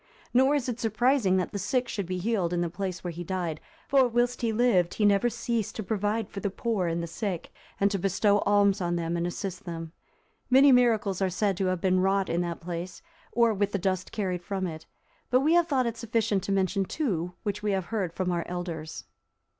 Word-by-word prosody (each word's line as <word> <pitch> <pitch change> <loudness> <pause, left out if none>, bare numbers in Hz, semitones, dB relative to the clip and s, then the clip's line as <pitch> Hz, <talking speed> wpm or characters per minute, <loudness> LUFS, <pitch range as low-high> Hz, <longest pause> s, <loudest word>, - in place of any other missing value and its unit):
Nor 265 +4 +4
is 275 -4 -1
it 240 -2 -3
surprising 225 -3 +2
that 185 - -1
the 200 - -4
sick 245 +6 0
should 200 -6 -3
be 185 0 -2
healed 185 -3 0
in 175 - 0
the 170 -1 -1
place 185 0 -4
where 175 - -3
he 170 +1 -6
died; 175 -3 -3 0.3
for, 270 -3 +4
whilst 240 +1 0
he 230 -2 +1
lived, 215 -7 +2
he 210 - +2
never 205 +4 +4
ceased 230 -2 -2
to 220 - -4
provide 210 +2 -1
for 200 - -7
the 200 - -1
poor 200 -2 -1
and 170 0 -1
the - - -4
sick, 175 0 -4 0.3
and 200 0 +3
to 200 - -1
bestow 200 +2 +2
alms 200 -1 +3
on 175 -1 0
them, 170 0 -2
and 170 0 -1
assist 185 +1 -5
them. 165 -2 -6 0.6
Many 270 +2 +7
miracles 225 -6 +3
are 190 - +2
said 195 +2 0
to 190 -1 0
have 185 -2 -1
been 185 -1 +3
wrought 195 0 +1
in 170 - +1
that 170 -1 -4
place, 175 - -6 0.3
or 235 -2 +3
with 205 0 -1
the - - +2
dust 185 -1 -2
carried 185 -5 -2
from 190 +1 -3
it; 160 -3 -7 0.4
but 255 +1 +4
we 310 +4 +3
have 345 -1 +4
thought 265 -5 +1
it 230 -1 -2
sufficient 220 -3 0
to - - -2
mention 195 0 +1
two, 180 - -2
which 205 0 -2
we 210 - -1
have 190 -2 -1
heard 195 -6 0
from 180 +1 -2
our 170 -1 -1
elders. 170 -3 -5
195 Hz, 225 wpm, -27 LUFS, 180-225 Hz, 0.6 s, Many